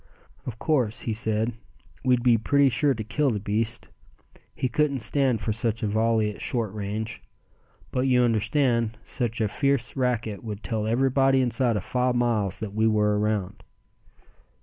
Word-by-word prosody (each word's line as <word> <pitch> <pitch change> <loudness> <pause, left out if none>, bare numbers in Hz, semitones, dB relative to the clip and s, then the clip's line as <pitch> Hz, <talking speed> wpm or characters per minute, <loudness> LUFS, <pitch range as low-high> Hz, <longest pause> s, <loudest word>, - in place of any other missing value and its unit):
"Of 120 -2 -5
course," 125 -5 0
he 115 - -2
said, 110 +1 0 0.5
"we'd 125 -2 +2
be 120 -2 +5
pretty 140 +5 +3
sure 135 +3 +2
to 110 - -4
kill 145 +6 0
the 110 -4 -1
beast. 110 +3 -2 0.7
He 130 - -1
couldn't 145 -1 0
stand 130 -2 +1
for 105 +1 -1
such 115 0 -1
a - - +1
volley 110 0 +1
at - - -12
short 115 -5 -2
range. 105 +2 -4 0.7
But 130 +1 0
you 125 -1 +4
understand, 115 0 +1
such 120 -2 -3
a 110 - +2
fierce 140 +1 0
racket 120 -5 -1
would 105 -2 -6
tell 110 -2 -2
everybody 135 +3 +3
inside 120 -2 +1
of 100 - -4
five 125 +2 0
miles 110 -5 0
that 105 -2 -5
we 110 +1 +2
were 105 -1 +2
around." 105 -3 -2
115 Hz, 165 wpm, -25 LUFS, 110-125 Hz, 0.7 s, be